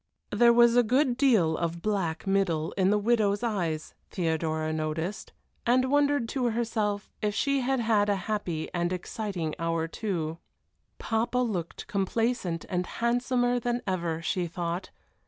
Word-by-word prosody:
There 240 0 +5
was 235 0 +6
a 245 - +7
good 250 +3 +2
deal 225 - +3
of 170 0 -3
black 190 -6 -1
middle 190 -5 +1
in 190 -1 +2
the 210 - +3
widow's 210 -1 +2
eyes, 175 -9 -2 0.2
Theodora 160 -2 -1
noticed, 160 +5 -3 0.3
and 255 +2 +2
wondered 285 -4 +3
to 260 -3 -1
herself 220 -3 -1
if 210 -1 0
she 275 +3 +1
had 265 +1 0
had 215 -3 +2
a 205 - +3
happy 180 -7 -2
and 175 0 0
exciting 180 -3 -3
hour 165 -1 0
too. 165 -4 -3 0.6
Papa 230 +2 -1
looked 205 -9 -2
complacent 200 -3 -1
and 180 0 -1
handsomer 245 +1 +1
than 240 +1 -2
ever, 170 -3 -2
she 180 +1 -1
thought. 170 +2 -4
205 Hz, 145 wpm, -28 LUFS, 170-240 Hz, 0.6 s, a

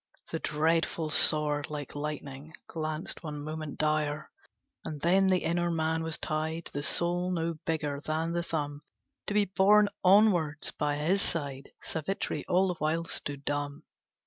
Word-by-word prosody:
The - - -2
dreadful 160 +1 +1
sword 150 -1 +3
Like 145 -2 -5
lightning 145 +1 -5
glanced 155 +1 -4
one 150 -3 -5
moment 155 -1 -5
dire; 155 0 0 0.5
And 150 -2 -5
then 190 +4 +4
the 185 -1 +3
inner 175 +1 +1
man 160 -1 0
was 160 -1 -2
tied, 160 +2 -3
The 145 - -2
soul 175 +4 0
no 165 -2 -1
bigger 150 -3 -1
than 160 +2 -1
the 170 0 0
thumb, 145 -3 -3 0.5
To 205 - -1
be 210 -1 +4
borne 205 +2 +5
onwards 180 -6 +4
by 145 -1 -1
his 170 +7 +1
side: 140 -6 -2
Savitri 165 +5 -2
all 185 +2 +3
the 175 - -3
while 160 +2 0
stood 145 -3 -4
dumb. 145 0 -2
160 Hz, 150 wpm, -30 LUFS, 150-170 Hz, 0.5 s, borne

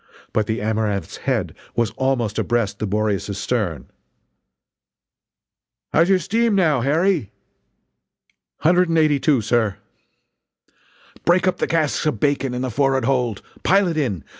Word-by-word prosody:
But 110 -1 +1
the 110 0 -2
Amaranth's 105 -5 -2
head - - -2 0.2
was 115 -2 +1
almost 125 -5 -1
abreast 110 -4 -1
the 110 - -2
Boreas's 105 -1 -1
stern: 105 -6 -2 2.1
"How's 170 +3 +4
your 190 - +5
steam, 220 +5 +1
now, 155 -9 +2
Harry?" 155 - +1 1.3
"Hundred 175 +2 +3
and 165 - +1
eighty 155 -3 +3
two, 140 -4 +2
sir!" 110 -2 0 1.5
"Break 180 +1 +3
up 180 -1 +1
the - - 0
casks 155 -2 0
of 125 -9 -1
bacon 135 -2 0
in 125 - -3
the 130 - -2
forrard 135 +1 +1
hold! 125 -6 0 0.2
Pile 195 0 +3
it 170 - -2
in! 115 - -1
130 Hz, 140 wpm, -21 LUFS, 110-165 Hz, 2.1 s, your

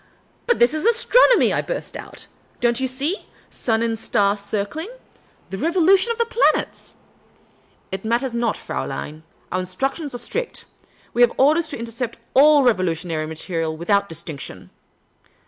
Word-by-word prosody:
*' - - -37
But 480 - +3
this 240 +3 +4
is 310 0 -2
astronomy," 475 +2 +5
I - - +1
burst - - -5
out. - - -9 0.2
" - - -35
Don't 240 0 +2
you 265 - 0
see? 280 - -2 0.2
Sun 225 -1 0
and 225 -1 -1
star 200 -2 +2
circling. 205 - -3 0.6
The 190 - -4
revolution 370 - +3
of 465 - -3
the 465 - +2
planets." 465 +1 +1 0.5
" - - -36
It 190 0 -4
matters 235 +3 0
not, 235 -2 0
Fraulein. 155 +1 -5 0.3
Our 185 - 0
instructions 270 - -3
are - - -2
strict. 475 - -4 0.5
We 240 - +1
have 240 -1 +5
orders 310 +5 +4
to - - -5
intercept 235 +1 -4
«// - - -39 0.3
revolutionary 170 -7 0
literature 160 +1 -3
with 160 +4 -4
out 200 0 +3
distinction." 155 -2 -7
235 Hz, 160 wpm, -21 LUFS, 190-315 Hz, 0.6 s, astronomy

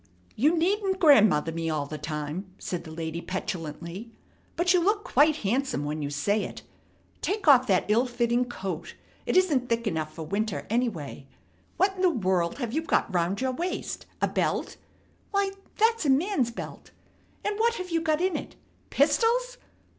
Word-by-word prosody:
"You 300 +9 +3
needn't 380 +2 +1
'grandmother' 215 - +5
me 165 0 -2
all 150 -2 -1
the 150 +1 -7
time," 155 +5 -5
said 180 -1 -5
the 160 - -9
lady 165 +1 -4
petulantly. 180 +3 -5 0.4
"But 350 +1 +3
you 360 - +5
look 410 +4 +1
quite 300 +3 +4
handsome 240 - 0
when 150 +1 -3
you 145 - -2
say 200 +9 0
it. - - -7 0.6
Take 405 -2 -2
off 260 -3 +7
that 185 -4 +3
ill 230 +5 +3
fitting 240 0 +1
coat. 190 -8 -6 0.3
It - - +2
isn't 295 -10 +2
thick 230 0 0
enough 160 -6 -2
for 160 0 -7
winter, 200 +5 -2
anyway. 200 - -2 0.5
What 385 0 +2
in - - -3
the 370 - +5
world 185 - 0
have 240 -4 -3
you 315 - +1
got 320 -10 0
round 175 +4 0
your 260 0 +1
waist? 345 +8 -4 0.2
A - - +5
belt? - - -1 0.5
Why, 400 -1 +1 0.3
that's 455 0 +3
a 295 - +1
man's 275 - +2
belt! 230 - -8 0.6
And 415 0 -1
what 465 +1 +3
have 365 -3 -6
you 330 -1 +1
got 315 0 +1
in 370 0 +1
it? - - -5 0.3
Pistols? 460 - +2
240 Hz, 175 wpm, -27 LUFS, -, 0.6 s, off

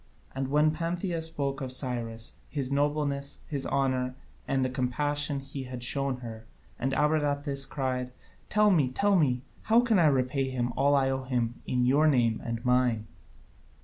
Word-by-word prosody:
And 135 0 -2
then 150 +1 +4
Pantheia 170 +1 -2
spoke 140 -3 -2
of 130 -1 -4
Cyrus, 120 -3 -3
his 140 -3 -1
nobleness, 145 0 0
his 140 -3 -1
honour, 130 -2 0 0.3
and 135 -1 +1
the - - 0
compassion 145 +3 -1
he 135 0 -7
had 125 -1 -7
shown 135 0 -1
her, 110 -2 -8 0.3
and 135 - 0
Abradatas 145 -2 +1
cried: 130 -2 -2 0.4
"Tell 210 -1 +4
me, 150 -8 +3
tell 200 +10 +2
me, 130 -7 +2 0.2
how 225 +2 +4
can 230 -5 +3
I 165 - +5
repay 135 -1 +1
him 120 -2 -2
all 140 +2 +3
I 135 -1 +3
owe 130 0 -3
him 120 -2 -1
in 125 -1 +1
your 145 +5 +4
name 120 -6 +2
and 115 0 -4
mine!" 125 -3 +2
135 Hz, 165 wpm, -28 LUFS, 125-145 Hz, 0.4 s, I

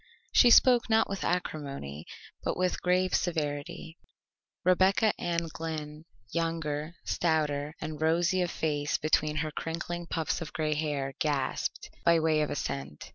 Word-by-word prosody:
She 245 - +7
spoke 245 0 +6
not 220 0 +4
with 195 0 -4
acrimony, 140 - -3 0.4
but - - -1
with 185 0 0
grave 180 +1 +2
severity. 160 0 -2 0.7
Rebecca 190 +4 +4
Ann 170 -1 -1
Glynn, 155 -1 -5 0.3
younger, 165 -1 -2
stouter 150 -2 0
and 155 -1 -6
rosy 170 +3 +2
of 175 - 0
face 150 -3 -1
between 155 0 +1
her 155 - -4
crinkling 170 +2 -4
puffs 160 0 -1
of 160 - -6
gray 155 -1 0
hair, 145 -3 -2
gasped, 140 -4 -1
by 170 -1 +5
way 155 -1 +2
of 150 - 0
assent. 70 - -4
160 Hz, 135 wpm, -29 LUFS, 150-175 Hz, 0.7 s, She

